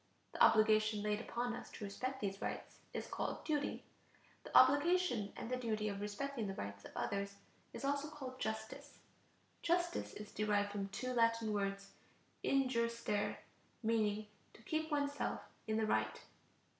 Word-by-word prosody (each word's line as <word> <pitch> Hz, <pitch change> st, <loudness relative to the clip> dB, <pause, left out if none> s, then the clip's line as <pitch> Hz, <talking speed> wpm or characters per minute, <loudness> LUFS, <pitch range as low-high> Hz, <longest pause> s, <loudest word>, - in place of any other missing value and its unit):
The -, -, +3 dB
obligation 215 Hz, -1 st, +5 dB
laid 210 Hz, 0 st, +1 dB
upon 240 Hz, 0 st, -2 dB
us 245 Hz, -, -8 dB
to -, -, -7 dB
respect 255 Hz, +7 st, -3 dB
these 195 Hz, -1 st, -2 dB
rights -, -, -4 dB
is -, -, -3 dB
called -, -, -3 dB
duty. 295 Hz, -2 st, 0 dB, 0.6 s
The -, -, +3 dB
obligation 285 Hz, -, +5 dB
and -, -, -4 dB
the 255 Hz, -, 0 dB
duty 215 Hz, -3 st, 0 dB
of 200 Hz, 0 st, -4 dB
respecting 225 Hz, +3 st, -2 dB
the 195 Hz, -, -3 dB
rights 100 Hz, -, -5 dB
of -, -, -10 dB
others 200 Hz, 0 st, -1 dB, 0.4 s
is -, -, -5 dB
also 285 Hz, +1 st, 0 dB
called 265 Hz, -4 st, -7 dB
justice. 220 Hz, +6 st, -4 dB, 0.6 s
Justice 345 Hz, 0 st, +1 dB
is 210 Hz, 0 st, -8 dB
derived 205 Hz, -1 st, +1 dB
from 200 Hz, -1 st, -2 dB
two 255 Hz, +5 st, -3 dB
Latin 230 Hz, -2 st, +3 dB
words 195 Hz, -1 st, -1 dB, 0.5 s
(in 270 Hz, -1 st, +3 dB
jure 235 Hz, -2 st, +2 dB
stare), 220 Hz, -3 st, -1 dB, 0.4 s
meaning: 215 Hz, -1 st, +2 dB, 0.3 s
to 230 Hz, -, -16 dB
keep 315 Hz, +4 st, -1 dB
oneself 285 Hz, -1 st, 0 dB, 0.3 s
in 220 Hz, 0 st, +1 dB
the 220 Hz, -, +2 dB
right. 110 Hz, -, +1 dB
220 Hz, 155 wpm, -38 LUFS, 205-270 Hz, 0.6 s, obligation